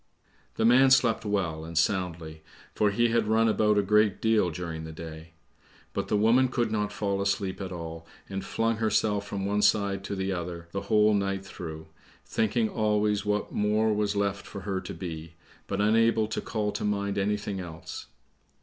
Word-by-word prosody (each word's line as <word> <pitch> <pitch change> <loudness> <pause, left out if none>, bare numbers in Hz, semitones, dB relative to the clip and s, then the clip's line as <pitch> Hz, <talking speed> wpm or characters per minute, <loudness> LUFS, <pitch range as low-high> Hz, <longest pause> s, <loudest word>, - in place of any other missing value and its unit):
The 110 - +1
man 130 +3 +6
slept 120 -4 +3
well 90 -7 -1
and 80 0 -6
soundly, 85 -3 -1 0.3
for 105 - +2
he 120 +4 +2
had 115 -2 +1
run 110 +1 +3
about 105 -1 +3
a 100 - +3
great 105 0 +3
deal 110 -5 +2
during 80 -1 -5
the 80 - -7
day; 80 0 -9 0.6
but - - -2
the 105 - +1
woman 115 +5 +4
could 120 -3 -1
not 105 -1 -1
fall 100 -1 -1
asleep 100 -1 -1
at 95 -1 -5
all, 80 -1 -7 0.2
and 95 0 -4
flung 115 0 0
herself 105 -2 +1
from 95 -1 -3
one 105 +1 +1
side 100 -1 +2
to 100 - -3
the 95 0 -2
other 85 -2 -5
the 100 - -3
whole 105 -1 +5
night 100 -1 -1
through, 80 -4 -8 0.4
thinking 110 +1 +1
always 105 -1 0
what 105 0 0
more 105 +1 +2
was 105 0 0
left 100 0 -1
for 100 - -7
her 95 -1 -2
to - - -7
be, 80 -2 -7 0.3
but 100 - -2
unable 110 +1 +3
to - - -2
call 105 -2 -2
to 105 - -4
mind 100 -1 -1
anything 100 0 -1
else. 85 -2 -8
100 Hz, 185 wpm, -28 LUFS, 90-110 Hz, 0.6 s, man